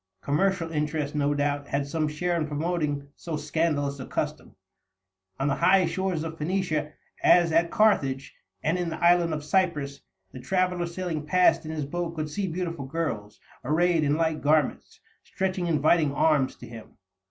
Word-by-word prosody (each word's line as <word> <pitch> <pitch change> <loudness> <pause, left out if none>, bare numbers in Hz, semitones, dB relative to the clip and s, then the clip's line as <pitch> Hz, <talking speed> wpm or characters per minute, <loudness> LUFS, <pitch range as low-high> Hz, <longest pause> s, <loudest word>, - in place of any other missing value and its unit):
Commercial 165 +2 0
interest, 150 -1 -2
no 145 -1 +1
doubt, 145 0 -1
had 140 0 -1
some 155 +2 -1
share 175 +4 -1
in 160 -2 -1
promoting 150 -2 -2
so 165 -3 -5
scandalous 150 -2 -1
a 130 - -7
custom. - - -4 0.8
On 135 - 0
the 140 - 0
high 185 0 +4
shores 180 -1 -1
of 160 0 -6
Phoenicia, 155 -3 -1 0.3
as 175 -2 +5
at 165 +1 +3
Carthage 145 - +2 0.3
and 165 +4 +1
in 175 -1 -1
the 160 - -5
island 175 -1 +4
of 150 -1 -3
Cyprus, 150 -5 0 0.3
the 130 - -9
traveler 180 +5 0
sailing 170 -3 -4
past 180 0 +3
in - - -4
his 155 -3 -3
boat 170 +3 -4
could 155 -1 -4
see 200 +4 -2
beautiful 170 -4 -4
girls, 115 -10 -4 0.2
arrayed 165 +4 +2
in 145 0 +2
light 160 -1 0
garments, 150 -1 +1 0.2
stretching 185 -2 -2
inviting 155 -1 +3
arms 140 -2 +2
to 120 - -12
him. 115 -1 -12
155 Hz, 165 wpm, -26 LUFS, 145-175 Hz, 0.8 s, as